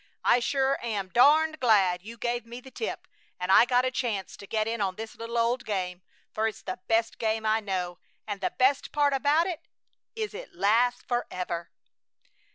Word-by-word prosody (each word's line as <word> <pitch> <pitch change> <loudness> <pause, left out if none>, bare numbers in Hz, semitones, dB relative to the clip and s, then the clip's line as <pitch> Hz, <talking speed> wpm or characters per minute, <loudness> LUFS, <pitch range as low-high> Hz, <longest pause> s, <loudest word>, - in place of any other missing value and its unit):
I 245 - +5
sure 270 +2 +1
am 205 -5 -2
darned 310 - +4
glad 195 -7 +3
you 230 +4 -10
gave 240 +1 -2
me 235 +1 -9
the 265 +1 -14
tip 450 - -5 0.3
and 180 +1 -1
I 230 - +8
got 245 +1 +2
a 255 - 0
chance 225 -7 -3
to 200 - -11
get 215 +1 0
in 230 -1 -2
on 190 -2 0
this 225 +1 -7
little 230 +1 -5
old 235 +2 +1
game, 185 -5 -3 0.3
for 220 +1 +1
it's 220 - -6
the 185 - -5
best 225 0 +1
game 220 0 -1
I 215 +1 +3
know, 185 -4 -3 0.3
and 205 -2 -5
the - - +1
best 265 +2 +1
part 290 -1 +2
about 290 +5 +3
it 345 -2 -5 0.5
is 435 -2 -3
it - - -9
lasts 235 +4 +2
forever!" 180 -8 -3
230 Hz, 190 wpm, -27 LUFS, 200-255 Hz, 0.5 s, I